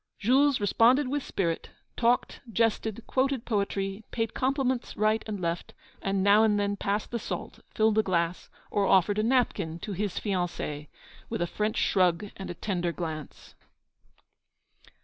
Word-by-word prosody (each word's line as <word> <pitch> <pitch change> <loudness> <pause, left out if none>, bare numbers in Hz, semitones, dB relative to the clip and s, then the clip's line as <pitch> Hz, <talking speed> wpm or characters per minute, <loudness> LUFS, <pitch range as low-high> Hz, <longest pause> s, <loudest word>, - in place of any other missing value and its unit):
Jules 270 +5 +3
responded 240 +7 +4
with 290 +2 -1
spirit, 170 -9 -2 0.3
talked, 240 +1 +1
jested, 225 +1 0
quoted 265 -2 0
poetry, 200 -1 -1
paid 225 -1 -2
compliments 260 -1 -1
right 215 +1 +2
and 210 -2 -4
left, 170 -1 -3 0.3
and 195 -1 0
now 205 +2 +6
and 210 -2 +3
then 205 0 0
passed 200 +1 -2
the 235 - -2
salt, - - -6 0.2
filled 220 0 +3
a - - +7
glass, 175 -3 -1 0.2
or 200 -1 +2
offered 195 +2 +4
a - - +2
napkin 230 -9 +1
to 210 - -5
his 200 0 -2
fiancée 175 -6 -3 0.4
with - - -3
a - - +1
French 210 +5 -2
shrug 185 +1 +2
and 195 - -7
a 175 - -5
tender 175 -2 -1
glance. 160 -3 -6
205 Hz, 150 wpm, -28 LUFS, 185-230 Hz, 0.4 s, a